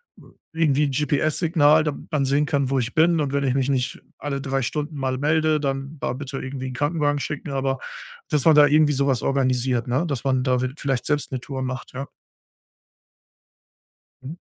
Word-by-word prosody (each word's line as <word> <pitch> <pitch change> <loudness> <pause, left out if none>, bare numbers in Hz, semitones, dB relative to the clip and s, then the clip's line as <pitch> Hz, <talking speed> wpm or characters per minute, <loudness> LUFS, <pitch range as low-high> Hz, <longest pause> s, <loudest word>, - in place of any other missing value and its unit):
w - - -18 0.2
irgendwie 150 -3 +2
'n 140 - -1
GPS-Signal, 150 +2 +2
damit 150 -2 -5
man 150 -2 +1
sehen 140 +2 +2
kann, 140 -3 0
wo 135 0 +1
ich 120 0 -3
bin 165 0 +3
und 140 -2 -1
wenn 140 0 +1
ich 130 -1 +1
mich 135 -1 +1
nicht 130 -2 -1 0.2
alle 140 -1 -3
3 135 0 -1
Stunden 150 +4 -3
mal 130 -2 -2
melde, 155 +2 +2
dann 135 +1 -3
da - - -2
bitte 135 +1 -6
irgendwie 130 0 -5
'n - - -7
Krankenwagen 145 +1 0
schicken.“ 145 +1 -5
Aber, 135 -1 -1 0.5
dass 150 -3 0
man 160 -2 +7
da 150 -1 +7
irgendwie 150 0 +4
sowas 135 -3 +1
organisiert, 130 -2 0
ne, 130 +8 0
dass 140 -6 -3
man 130 -2 +1
da 125 -2 +1
wid 130 +3 -4
vielleicht 135 -3 -1
selbst 145 -2 -1
'ne 130 - -1
Tour 135 +1 -5
macht, 130 0 -5
ja. 135 +2 -5 2.2
Mhm. 140 +5 -7
140 Hz, 195 wpm, -23 LUFS, 130-150 Hz, 2.2 s, man